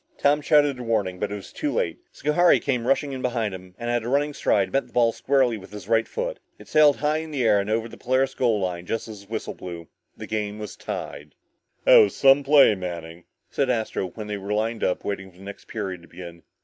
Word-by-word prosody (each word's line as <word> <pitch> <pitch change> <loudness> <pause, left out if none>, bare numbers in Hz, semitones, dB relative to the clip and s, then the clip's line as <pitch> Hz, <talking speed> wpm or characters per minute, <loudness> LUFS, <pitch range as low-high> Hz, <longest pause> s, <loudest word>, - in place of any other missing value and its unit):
Tom 145 +1 +3
shouted 145 -3 +3
a - - -5
warning 105 -6 -1
but 105 0 -2
it - - -3
was 100 -2 -10
too 295 - -2
late. - - -1
Schohari 170 +4 +3
came 125 -4 -1
rushing 140 +1 +1
in 130 -1 -5
behind 115 -5 -1
him, 90 -1 -11
and 120 0 -3
at 120 -1 0
running 140 +5 0
stride, 100 -7 +1
met 135 -2 +1
the - - -24
ball 120 -1 +4
squarely 130 -2 +1
with 95 0 -13
his 105 -1 -9
right 115 0 +2
foot. - - -4 0.2
It - - -15
sailed 150 -2 +5
high 150 +1 +1
in 160 0 -5
the 140 -4 -2
air 105 -3 +4
and 100 +1 -3
over 110 +1 0
the - - -12
Polaris 130 +2 +1
goal 115 -6 +1
line 90 -2 -3
just 115 - -3
as 105 -2 -9
the 100 - -18
whistle 110 - -4
blew. 85 -2 -9 0.3
The - - -7
game 105 -1 -3
was 105 -1 -7
tied. - - -7 0.5
"That - - +8
was 435 -3 +5
some 135 +1 +5
play, 140 -4 +6
Manning," 85 -3 -7 0.3
said 135 -2 0
Astro, 110 -5 -1
when 105 +4 -8
they 105 -1 -4
were 100 +1 -4
lined 110 +2 -1
up 90 - -1
waiting 95 -1 -4
for 90 - -23
the 95 - -14
next 100 0 -10
period 95 -5 -5
to 85 - -17
begin. 85 -1 -10
115 Hz, 240 wpm, -24 LUFS, 100-135 Hz, 0.5 s, That